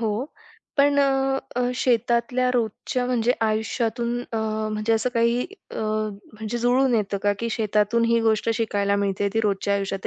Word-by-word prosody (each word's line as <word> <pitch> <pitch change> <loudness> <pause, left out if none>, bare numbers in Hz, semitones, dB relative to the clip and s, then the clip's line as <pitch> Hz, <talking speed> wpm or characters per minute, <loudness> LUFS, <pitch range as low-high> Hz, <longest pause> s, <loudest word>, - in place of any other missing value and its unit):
हो, 225 -2 0 0.7
पण 285 0 +4
अ, 270 -1 +2 0.2
अ, - - +1
शेतातल्या 245 +1 +1
रोजच्या 240 +2 -1
म्हणजे 245 -1 +2
आयुष्यातून 225 +2 -1
अ, - - -1 0.4
म्हणजे 215 +1 0
असं 225 +3 +2
काही 235 +1 +2 0.3
अ, - - -7 0.6
म्हणजे 220 +2 -4
जुळून 245 +2 +3
येतं 205 -2 0
का, 205 - +3
की 230 +2 -2
शेतातून 215 +1 +1
ही 230 0 +3
गोष्ट 225 0 +1
शिकायला 205 -3 0
मिळते, 200 0 0
ती 225 - +3
रोजच्या 200 -1 0
आयुष्यात 195 -1 -2
230 Hz, 155 wpm, -24 LUFS, 210-245 Hz, 0.7 s, पण